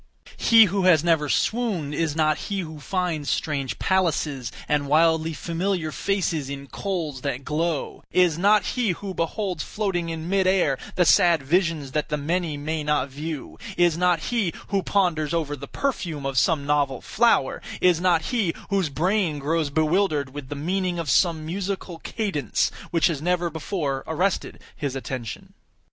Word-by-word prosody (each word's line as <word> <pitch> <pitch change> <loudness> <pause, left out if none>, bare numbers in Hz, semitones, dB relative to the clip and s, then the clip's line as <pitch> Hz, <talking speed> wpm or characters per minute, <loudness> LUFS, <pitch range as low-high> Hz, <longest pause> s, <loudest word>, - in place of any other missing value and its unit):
He 225 -1 +7
who 195 -1 0
has 165 -4 +5
never 160 -4 +2
swooned, 205 - 0
is 155 0 -1
not 155 -1 +3
he 200 -1 -1
who 160 -3 -8
finds 165 -2 -2
strange 140 -4 -1
palaces 155 - 0 0.2
and 145 -1 +1
wildly 160 +2 +3
familiar 170 +1 -2
faces 170 -8 -1
in 140 0 -6
coals 160 -5 -4
that 135 -1 -3
glow; 160 0 -2
is 180 -4 +4
not 200 +3 +4
he 235 -7 +1
who 195 +2 -6
beholds 180 0 -2
floating 190 -5 -2
in 165 0 -5
mid 190 0 +2
air 180 -8 +2 0.2
the 180 - +3
sad 170 -3 +5
visions 165 -2 0
that 150 +2 -1
the 150 - 0
many 160 +1 -1
may 155 +2 -3
not 150 -2 0
view; 150 +1 -6 0.2
is 175 -2 +4
not 180 -1 +2
he 220 -8 +1 0.2
who 200 -1 +1
ponders 170 -6 +1
over 150 -3 -1
the 140 0 -9
perfume 170 - -3
of 135 -1 -2
some 155 -3 +1
novel 140 -3 +1
flower; - - +2 0.2
is 175 -2 +3
not 175 -3 +3
he 205 -9 +1 0.2
whose 195 -5 +1
brain 175 +2 0
grows 155 +2 0
bewildered 155 -2 +1
with 145 -3 -7
the 145 - -4
meaning 180 +4 -1
of 165 -6 -1
some 160 - +2
musical 185 0 -4
cadence 190 - -1 0.2
which 165 -1 +2
has 155 -5 +1
never 175 0 0
before 150 -4 -3
arrested 180 +4 -1 0.2
his 140 -3 -3
attention. 130 -4 -6
165 Hz, 165 wpm, -24 LUFS, 145-185 Hz, 0.2 s, He